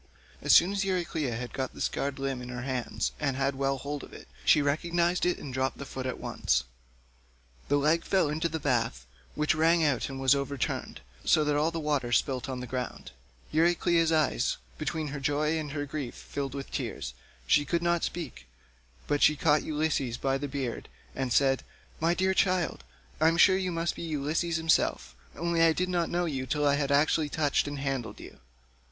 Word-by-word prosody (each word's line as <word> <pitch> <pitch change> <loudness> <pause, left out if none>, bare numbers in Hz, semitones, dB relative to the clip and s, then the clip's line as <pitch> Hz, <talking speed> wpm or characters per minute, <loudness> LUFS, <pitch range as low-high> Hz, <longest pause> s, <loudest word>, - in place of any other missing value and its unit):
As - - +1
soon 180 +3 +7
as 200 0 0
Euryclea 170 -9 -1
had 120 +1 -6
got 130 -1 -3
the - - -10
scarred 140 -1 -1
limb 135 -2 -2
in 125 - -7
her 125 0 -5
hands 125 - -2
and 135 -1 -1
had 135 0 +1
well 135 0 0
hold 145 +1 -5
of - - -12
it, - - -11 0.2
she 155 - +5
recognised 170 +5 +1
it 180 - +1
and 135 - -8
dropped 130 +1 -1
the 140 - -6
foot 130 -1 -5
at 130 - -3
once. - - 0 1.0
The 145 - +3
leg 155 +4 +2
fell 190 -5 +2
into 160 +3 -1
the 160 0 -3
bath, 115 - 0 0.3
which 150 +1 +2
rang 165 +1 +3
out 140 -5 +1
and 135 -1 -6
was 135 0 +5
overturned, 140 -2 -3 0.2
so 155 - +4
that 150 -1 +1
all 150 +2 +2
the 165 0 -4
water 150 -5 0
was 120 - +4
spilt 135 0 -2
on 130 -1 -4
the - - -5
ground; 125 - -5 0.4
Euryclea's 170 0 +3
eyes 155 -6 +1 0.2
between 155 0 -2
her 140 +1 -5
joy 150 +3 +1
and 150 -2 -5
her 145 0 -3
grief 140 -3 -5
filled 140 -1 -5
with 135 -1 -6
tears, - - -4 0.3
and - - -9
she 145 - +6
could 170 +4 -1
not 170 -1 +1
speak, 145 - -5 0.6
but 145 0 0
she 150 - +6
caught 150 +1 +3
Ulysses 150 -6 -1
by 135 +1 0
the 145 - -3
beard 135 -4 -4 0.3
and 130 -2 -2
said, 135 +1 +3 0.4
"My 165 +2 +2
dear 190 +1 +2
child, 185 - +1 0.4
I 160 - +5
am 165 +1 +3
sure 185 +2 +7
you 185 -1 -1
must 170 0 -1
be - - -7
Ulysses 160 +1 -1
himself, 160 - +1 0.2
only 170 +1 0
I 165 -1 +6
did 180 +3 -1
not 175 -2 0
know 175 0 0
you 135 -5 -3
till 150 +2 0
I 140 - +4
had 140 -1 0
actually 150 +1 +3
touched 145 -1 +1
and 145 0 -4
handled 135 -4 -3
you." - - -12
145 Hz, 205 wpm, -29 LUFS, 135-165 Hz, 1.0 s, soon